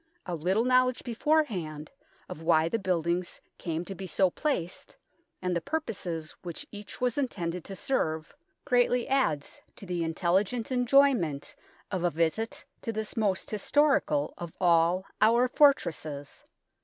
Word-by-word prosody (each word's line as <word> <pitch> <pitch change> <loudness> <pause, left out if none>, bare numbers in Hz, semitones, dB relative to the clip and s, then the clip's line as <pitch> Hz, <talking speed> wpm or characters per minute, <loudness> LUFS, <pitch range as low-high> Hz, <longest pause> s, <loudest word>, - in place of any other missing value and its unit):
A 180 - -4
little 185 +8 +1
knowledge 255 0 +3
beforehand 220 - -1 0.4
of 155 - -8
why 160 -1 +3
the 225 +7 -1
buildings 175 -2 -1 0.2
came 165 0 -3
to 195 - -6
be 190 0 -7
so 185 +2 +2
placed, 185 - -3 0.5
and 180 -1 0
the 170 - 0
purposes 190 - -4
which 170 -2 -7
each 205 +2 -9
was 250 +1 0
intended 180 - -2
to 195 - -6
serve, 160 -10 -1 0.3
greatly 245 -1 +2
adds 210 - 0
to - - -10
the 175 -2 -2
intelligent 190 +8 0
enjoyment 245 - +3 0.4
of 185 -3 -2
a 175 - +3
visit 170 +8 -1 0.2
to 230 - -3
this 220 -1 -4
most 205 -4 0
historical 290 +6 +2
of 170 -2 -6
all 175 +1 +3 0.2
our 235 +3 +5
for 285 +3 +7
tresses. 150 - -7
190 Hz, 145 wpm, -29 LUFS, 170-245 Hz, 0.5 s, for